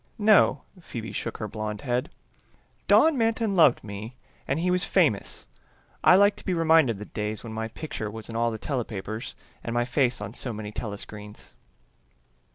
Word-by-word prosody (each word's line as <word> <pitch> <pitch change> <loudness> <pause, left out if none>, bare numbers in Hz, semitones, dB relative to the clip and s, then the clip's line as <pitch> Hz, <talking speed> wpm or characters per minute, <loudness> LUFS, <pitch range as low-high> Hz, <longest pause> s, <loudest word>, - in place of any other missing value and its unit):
"No," 215 -1 +4 0.2
Phoebe 115 - -7
shook - - -4
her 110 - -4
blonde 105 -1 -5
head. 125 -2 -1 0.8
"Don 315 -4 +5
Manton 225 -2 +1
loved 155 -8 +5
me 110 +3 -7 0.3
and 135 +4 0
he 180 +2 +1
was 180 +1 +1
famous. 150 - +1 0.6
I - - +8
like 200 +2 +5
to - - -7
be 185 - -1
reminded 160 -7 +4
of - - -10
the 105 - -7
days 105 0 -4
when 115 -2 -7
my 110 0 -3
picture 115 -3 -5
was 110 +1 -8
in 115 - -7
all 115 +1 +2
the 110 - -4
telepapers 110 -4 -4 0.3
and 115 - -4
my 120 0 +2
face 125 0 +1
on 105 +1 -6
so 125 - -3
many 105 -1 -6
telescreens." 105 -1 -8
115 Hz, 175 wpm, -26 LUFS, 110-165 Hz, 0.8 s, I